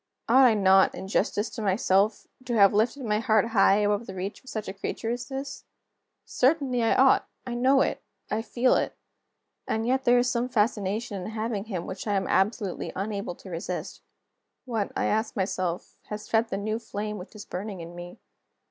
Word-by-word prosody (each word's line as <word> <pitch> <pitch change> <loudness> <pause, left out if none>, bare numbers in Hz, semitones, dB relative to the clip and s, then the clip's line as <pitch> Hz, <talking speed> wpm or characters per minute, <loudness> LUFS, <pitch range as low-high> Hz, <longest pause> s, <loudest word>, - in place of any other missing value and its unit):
Ought 260 +3 +6
I 235 -3 +5
not, 190 -1 +5
in 190 - -7
justice 205 +2 0
to 230 - -6
myself, 200 +1 +2 0.2
to 240 -2 -1
have 200 -2 +6
lifted 235 +6 +1
my 210 -1 +1
heart 220 -1 +2
high 195 -3 +5
above 205 +2 +1
the 190 - -7
reach 190 +2 -5
of 260 - -12
such 215 -2 -4
a 190 - -4
creature 225 +3 -4
as 245 +1 -4
this? 270 +1 -6 0.6
Certainly 260 -2 +1
I 225 - +3
ought! 265 0 +4 0.2
I 245 - -4
know 260 +3 +4
it, - - 0 0.3
I 215 - 0
feel 240 +3 +2
it. - - 0 0.7
And 220 +1 -1
yet, 260 +2 +1
there 245 -1 +5
is 245 +1 +3
some 245 0 0
fascination 210 -3 -1
in 180 - -5
having 220 -2 -3
him 185 -6 -4
which 190 +3 -6
I 205 - +1
am 195 - 0
absolutely 195 -1 0
unable 200 -2 -3
to 190 - -12
resist. 170 +3 -5 0.6
What, 225 -5 -2
I - - 0
ask 220 +1 0
myself, 185 -3 -2
has 210 0 -6
fed 225 +1 +2
the 195 - -2
new 215 +2 -2
flame 210 -2 -5
which 180 +4 -11
is 210 -1 -9
burning 195 +1 -5
in 170 +1 -8
me? 175 0 -9
215 Hz, 195 wpm, -27 LUFS, 195-235 Hz, 0.7 s, Ought